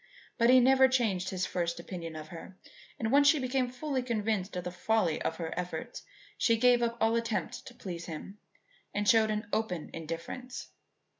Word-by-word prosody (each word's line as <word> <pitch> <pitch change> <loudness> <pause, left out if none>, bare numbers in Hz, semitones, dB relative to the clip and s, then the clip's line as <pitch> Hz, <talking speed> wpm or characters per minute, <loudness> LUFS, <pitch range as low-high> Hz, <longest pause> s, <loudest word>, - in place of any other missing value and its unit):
But 235 +1 +5
he 255 0 +8
never 265 +1 +6
changed 215 -8 +1
his 185 -1 -1
first 170 -1 -2
opinion 170 -2 -6
of 155 0 -8
her, 175 +2 -10 0.4
and 220 0 -1
once 285 +1 +6
she 305 - +6
became 255 -1 0
fully 260 +1 -2
convinced 215 -5 -1
of 180 - -3
the 180 - -4
folly 180 -2 +1
of 160 - -1
her 165 -2 -4
efforts, 180 +1 -5 0.4
she 230 -1 +3
gave 245 +1 +5
up 235 0 0
all 225 +1 +3
attempt 230 -1 -2
to 245 - -11
please 175 -6 -6
him 180 +5 -8 0.6
and 205 0 0
showed 220 -1 +5
an 215 +1 -1
open 180 -8 -2
indifference. 165 +10 -6
220 Hz, 180 wpm, -30 LUFS, 180-245 Hz, 0.6 s, he